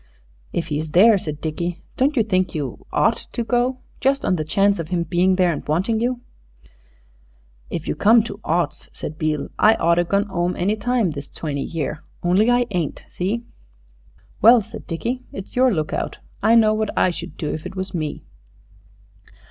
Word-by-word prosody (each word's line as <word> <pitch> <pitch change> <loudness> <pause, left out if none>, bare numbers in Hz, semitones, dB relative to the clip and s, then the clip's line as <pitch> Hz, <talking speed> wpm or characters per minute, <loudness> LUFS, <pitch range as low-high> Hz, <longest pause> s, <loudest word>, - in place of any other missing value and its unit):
"If 170 - -3
he's 150 0 -3
there," 210 +3 +7
said 150 -4 -6
Dickie, 170 +2 -3
"don't 280 +2 +1
you 230 - +5
think 185 -5 0
you 140 -6 -5
ought - - +1
to 235 - -1
go, 245 +2 0 0.2
just 275 +1 +1
on 185 - +2
the 155 - -2
chance 200 +5 +2
of 165 - -3
him 170 0 0
being 180 +3 +2
there 180 -2 +3
and 150 - -4
wanting 190 +9 +1
you?" 245 0 -1 1.5
"If 165 - -4
you - - 0
come 225 +2 +5
to 205 -2 -7
oughts," 170 +2 -1
said 155 - -7
Beale, 155 -2 -1
"I 220 +1 +6
oughter 170 +1 +3
gone 200 +4 +1
'ome 175 0 0
any 200 +4 +1
time 230 -3 0
this 145 -1 -7
twenty 145 -3 -4
year. 155 -1 -3 0.2
Only 185 +6 +3
I 245 0 +3
ain't. 175 -5 -2
See?" 205 +6 -2 1.0
"Well," 230 +2 +8
said - - -10
Dickie, 235 +10 -3
"it's 195 - -9
your 255 0 +4
lookout. 155 -6 -2 0.2
I 220 +3 +5
know 215 -2 +5
what 215 -1 -1
I 185 - +4
should 175 +1 -8
do 150 - -3
if 155 +3 -5
it 185 - -10
was 190 0 -4
me." 155 -4 -3
185 Hz, 180 wpm, -22 LUFS, 165-220 Hz, 1.5 s, Well